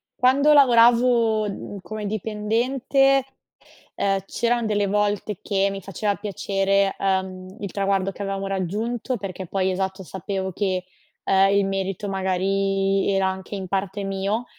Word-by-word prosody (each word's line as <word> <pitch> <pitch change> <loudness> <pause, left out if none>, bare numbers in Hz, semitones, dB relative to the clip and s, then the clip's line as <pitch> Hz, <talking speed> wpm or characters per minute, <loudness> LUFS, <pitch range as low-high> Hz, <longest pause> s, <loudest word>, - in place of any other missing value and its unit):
quando 275 +4 +4
lavoravo, 235 -4 +5
mhmm, 200 0 -7
come 215 +2 -6
dipendente, 235 +6 +1 0.7
ehm, 195 -1 +1
c'eran 235 +2 0
delle 205 -2 +1
volte 205 0 -1
che 200 -1 +1
mi 195 0 -6
faceva 200 +2 -2
piacere, 195 -1 0
ehm, 190 -1 -2
il 200 - -4
traguardo 195 -1 0
che 200 - -10
avevamo 195 0 -3
raggiunto, 210 +7 -2
perché 190 -2 -6
poi, 190 +1 0
esatto, 190 +1 -3
sapevo 190 +1 -4
che, 185 -1 -1 0.4
ehm, 195 0 +4
il 200 -1 +3
merito, 195 +1 -3
magari, 195 +1 0
era 195 -1 +2
anche 190 +2 -5
in 190 -1 -5
parte 195 +1 -2
mio. 195 +4 -2
195 Hz, 135 wpm, -23 LUFS, 195-215 Hz, 0.7 s, lavoravo